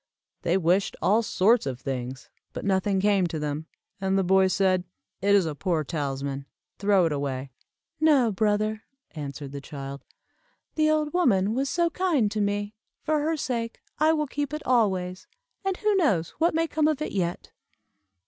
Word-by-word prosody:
They 175 Hz, +2 st, +2 dB
wished 185 Hz, +2 st, +1 dB
all 215 Hz, +4 st, +3 dB
sorts 215 Hz, -1 st, +3 dB
of 130 Hz, -2 st, -4 dB
things, 130 Hz, -1 st, -5 dB, 0.2 s
but -, -, -6 dB
nothing 195 Hz, 0 st, +1 dB
came 195 Hz, -2 st, +3 dB
to 165 Hz, -, -4 dB
them, 150 Hz, +1 st, -3 dB, 0.3 s
and 190 Hz, 0 st, +1 dB
the 195 Hz, -, +2 dB
boy 190 Hz, +1 st, +4 dB
said, 185 Hz, -1 st, +2 dB, 0.4 s
"It 200 Hz, +1 st, +4 dB
is 195 Hz, -3 st, +4 dB
a 160 Hz, -, -2 dB
poor 165 Hz, 0 st, -1 dB
talisman 140 Hz, -2 st, -3 dB, 0.3 s
throw 200 Hz, -3 st, +4 dB
it 165 Hz, -, 0 dB
away." 140 Hz, -2 st, -3 dB, 0.5 s
"No, 285 Hz, -7 st, +4 dB
brother," 215 Hz, +1 st, 0 dB, 0.3 s
answered 145 Hz, -2 st, -6 dB
the 140 Hz, 0 st, -6 dB
child; 140 Hz, -1 st, -7 dB, 0.7 s
"the 310 Hz, -1 st, +2 dB
old 305 Hz, -1 st, +1 dB
woman 215 Hz, -, +3 dB
was 270 Hz, +3 st, 0 dB
so 340 Hz, +1 st, +1 dB
kind 305 Hz, -, +1 dB
to 215 Hz, -, -1 dB
me, 205 Hz, +1 st, -1 dB, 0.3 s
for 310 Hz, -1 st, +1 dB
her 315 Hz, +2 st, 0 dB
sake 235 Hz, -5 st, -3 dB, 0.2 s
I 310 Hz, +1 st, +5 dB
will 305 Hz, -1 st, +1 dB
keep 290 Hz, +1 st, -3 dB
it 305 Hz, -, -7 dB
always, 190 Hz, -7 st, +1 dB, 0.4 s
and 385 Hz, -1 st, -1 dB
who 425 Hz, -1 st, +1 dB
knows 200 Hz, -, +2 dB
what 330 Hz, 0 st, +2 dB
may 330 Hz, 0 st, +2 dB
come 310 Hz, -1 st, +1 dB
of 310 Hz, -3 st, +1 dB
it 305 Hz, -, -3 dB
yet?" 175 Hz, -3 st, -2 dB
200 Hz, 175 wpm, -26 LUFS, -, 0.7 s, I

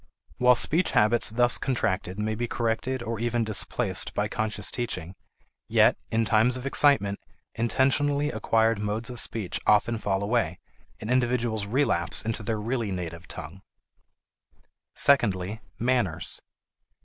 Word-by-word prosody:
While 125 Hz, 0 st, +6 dB
speech 160 Hz, +8 st, +2 dB
habits 110 Hz, +3 st, +3 dB
thus 120 Hz, +2 st, +4 dB
contracted 105 Hz, -7 st, -1 dB
may 110 Hz, +1 st, -1 dB
be 120 Hz, +2 st, -3 dB
corrected 120 Hz, +2 st, -2 dB
or 115 Hz, -1 st, -4 dB
even 120 Hz, 0 st, 0 dB
displaced 110 Hz, -3 st, 0 dB
by -, -, 0 dB
conscious 105 Hz, -2 st, -2 dB
teaching, 105 Hz, -8 st, -4 dB, 0.6 s
yet, -, -, +4 dB
in 115 Hz, 0 st, +1 dB
times 115 Hz, +4 st, +2 dB
of 130 Hz, -, -8 dB
excitement, 140 Hz, -8 st, +3 dB, 0.3 s
intentionally 140 Hz, +5 st, +1 dB
acquired 115 Hz, -1 st, +1 dB
modes 105 Hz, +3 st, -3 dB
of 120 Hz, -, -4 dB
speech 110 Hz, -6 st, -2 dB
often 110 Hz, +2 st, +3 dB
fall 100 Hz, -2 st, -1 dB
away, 100 Hz, -6 st, 0 dB, 0.4 s
and 110 Hz, -, -5 dB
individuals 120 Hz, -4 st, 0 dB
relapse 100 Hz, -8 st, 0 dB
into 115 Hz, 0 st, -3 dB
their 110 Hz, 0 st, -2 dB
really 115 Hz, 0 st, -2 dB
native 85 Hz, -2 st, -6 dB
tongue. -, -, -9 dB, 1.3 s
Secondly, 105 Hz, -6 st, +2 dB, 0.2 s
manners. 115 Hz, -9 st, -1 dB
115 Hz, 130 wpm, -26 LUFS, 105-120 Hz, 1.3 s, While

